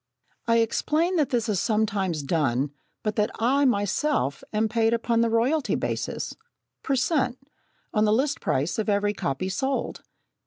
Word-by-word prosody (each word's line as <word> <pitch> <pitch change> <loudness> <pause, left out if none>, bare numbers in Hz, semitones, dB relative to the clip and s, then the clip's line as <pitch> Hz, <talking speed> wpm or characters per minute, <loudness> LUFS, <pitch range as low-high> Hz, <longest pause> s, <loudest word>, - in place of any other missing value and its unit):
I 230 0 +4
explain 320 +10 +1
that 300 -4 +2
this 240 -3 0
is 205 -4 0
sometimes 200 -8 0
done, 140 -3 0 0.3
but 215 -1 -1
that 210 0 +2
I 270 +5 +2
myself 205 - 0
am 215 +1 +1
paid 225 +1 +2
upon 230 0 +1
the 230 - +2
royalty 255 +7 +1
basis, - - -3 0.5
per 275 - 0
cent. 260 -2 +1 0.6
on 215 -1 +3
the 210 - +3
list 270 +6 +1
price 145 +10 0
of 220 - -1
every 205 0 +2
copy 140 -1 -2
sold. 265 +8 -2
225 Hz, 155 wpm, -25 LUFS, 200-260 Hz, 0.6 s, I